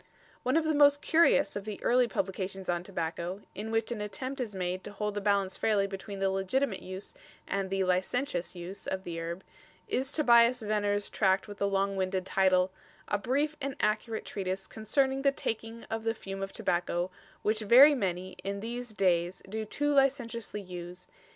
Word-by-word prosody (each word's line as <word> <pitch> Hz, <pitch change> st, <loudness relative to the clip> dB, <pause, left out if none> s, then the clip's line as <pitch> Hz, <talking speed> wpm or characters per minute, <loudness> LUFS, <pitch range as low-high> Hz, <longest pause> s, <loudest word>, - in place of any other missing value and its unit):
One 255 Hz, +5 st, +2 dB
of 325 Hz, -, +3 dB
the 315 Hz, 0 st, +1 dB
most 285 Hz, 0 st, +5 dB
curious 320 Hz, -3 st, +4 dB
of 205 Hz, -, -3 dB
the 210 Hz, -1 st, -6 dB
early 245 Hz, 0 st, +4 dB
publications 190 Hz, -2 st, -3 dB
on 175 Hz, -1 st, +1 dB
tobacco, 175 Hz, +1 st, -4 dB
in 215 Hz, +2 st, -5 dB
which 225 Hz, +1 st, 0 dB
an 225 Hz, -3 st, -3 dB
attempt 255 Hz, +6 st, -4 dB
is 215 Hz, -5 st, -4 dB
made 185 Hz, 0 st, -2 dB
to 205 Hz, -, -7 dB
hold 210 Hz, 0 st, -2 dB
the 205 Hz, -, -3 dB
balance 200 Hz, -2 st, +1 dB
fairly 210 Hz, -3 st, +2 dB
between 195 Hz, +1 st, -6 dB
the 195 Hz, 0 st, +1 dB
legitimate 195 Hz, +4 st, 0 dB
use 185 Hz, +2 st, -8 dB, 0.3 s
and 195 Hz, -1 st, -1 dB
the 195 Hz, 0 st, +1 dB
"licentious" 185 Hz, +2 st, 0 dB
abuse 180 Hz, +2 st, -8 dB
of 190 Hz, 0 st, -2 dB
the 170 Hz, -2 st, -5 dB
herb, 170 Hz, +3 st, -5 dB, 0.4 s
is 265 Hz, +2 st, -1 dB
Tobias 240 Hz, -4 st, +5 dB
Venner's 205 Hz, -1 st, 0 dB
tract 190 Hz, -1 st, +2 dB
with 205 Hz, -1 st, -9 dB
the 200 Hz, -, +2 dB
long 195 Hz, 0 st, +1 dB
winded 185 Hz, 0 st, -1 dB
title: 190 Hz, -1 st, +3 dB, 0.4 s
"A 205 Hz, -, +1 dB
Brief 285 Hz, +7 st, 0 dB
and 275 Hz, 0 st, -3 dB
Accurate 215 Hz, +1 st, 0 dB
Treatise 190 Hz, -1 st, -3 dB
concerning 265 Hz, +5 st, 0 dB
The 275 Hz, 0 st, +4 dB
taking 225 Hz, -3 st, -4 dB
of 225 Hz, 0 st, -4 dB
the 225 Hz, 0 st, 0 dB
Fume 195 Hz, -2 st, -6 dB
of 195 Hz, 0 st, -3 dB
Tobacco, 175 Hz, 0 st, -1 dB, 0.3 s
Which 215 Hz, +1 st, +1 dB
very 250 Hz, +8 st, +8 dB
many, 185 Hz, -6 st, -2 dB
in 200 Hz, +1 st, -3 dB
these 240 Hz, 0 st, -5 dB
dayes 180 Hz, -2 st, +1 dB
doe 220 Hz, +2 st, -3 dB
too 290 Hz, +7 st, 0 dB
licenciously 245 Hz, -6 st, +1 dB
use. 180 Hz, -1 st, -8 dB
205 Hz, 185 wpm, -30 LUFS, 190-235 Hz, 0.4 s, very